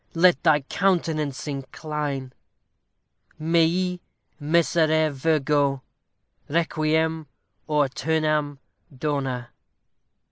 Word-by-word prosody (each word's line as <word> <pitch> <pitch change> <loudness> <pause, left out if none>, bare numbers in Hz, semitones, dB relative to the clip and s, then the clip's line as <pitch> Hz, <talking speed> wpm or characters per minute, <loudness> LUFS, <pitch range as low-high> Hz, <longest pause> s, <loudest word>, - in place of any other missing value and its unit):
Let 175 +1 +4
thy 155 -3 +4
countenance 155 -3 0
incline! 140 -1 -4 1.1
_Mei 170 +3 +1 0.4
miserere 155 0 +2
Virgo, 145 -1 +1 0.7
Requiem 160 0 0 0.4
æternam 150 0 0 0.4
dona! 135 -4 -2
155 Hz, 60 wpm, -24 LUFS, 145-160 Hz, 1.1 s, Let